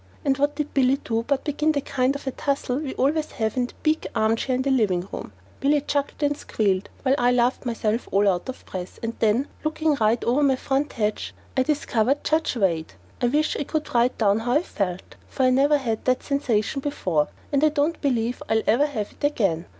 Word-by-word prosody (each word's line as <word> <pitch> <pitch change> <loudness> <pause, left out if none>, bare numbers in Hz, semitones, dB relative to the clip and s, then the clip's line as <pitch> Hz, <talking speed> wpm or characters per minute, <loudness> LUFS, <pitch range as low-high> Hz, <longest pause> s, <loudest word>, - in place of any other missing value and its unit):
And 275 -1 +3
what 290 +1 +1
did 300 -1 -3
Billy 265 0 +3
do 225 -1 0
but 280 -2 0
begin 300 +1 +1
the 285 - +1
kind 265 0 0
of 280 - -7
a 265 - -1
tussle 275 -2 -1
we 290 -3 -5
always 300 +3 0
have 220 -2 -1
in 250 -1 +1
the - - -16
big 310 0 +1
armchair 225 +4 +1
in 255 - 0
the 275 - +1
living 195 -8 +1
room! - - -6 0.3
Billy 290 +2 +3
chuckled 285 +1 -2
and 290 0 +2
squealed, 200 -8 -1
while 265 -1 +3
I 245 0 +4
laughed 245 +1 +1
myself 225 0 -1
all 200 +1 +3
out 180 +3 0
of 260 - -7
breath. 185 -1 -7
And 230 0 -2
then, 230 +5 +2 0.2
looking 310 0 +1
right 220 +2 +2
over 250 +5 +2
my 275 -2 +4
front 275 +3 -1
hedge, 215 -2 -2 0.2
I 260 - +3
discovered 270 -2 +1
Judge 315 -3 +1
Wade. 170 -8 0 0.3
I 245 - +3
wish 300 +5 +1
I - - -1
could 305 +1 -3
write 240 +1 +2
down 205 -1 +3
how 240 +2 -1
I 300 +5 +3
felt, 190 - -4
for 265 - -2
I 255 - +5
never 280 +3 +4
had 230 -6 -2
that 255 0 +1
sensation 275 -3 0
before, 180 - 0 0.2
and 285 0 +2
I 310 - +6
don't 300 +2 0
believe 245 -4 0
I'll 220 0 +2
ever 275 +7 +3
have 220 -8 -4
it - - -20
again. 195 - +1
255 Hz, 220 wpm, -24 LUFS, 220-285 Hz, 0.3 s, I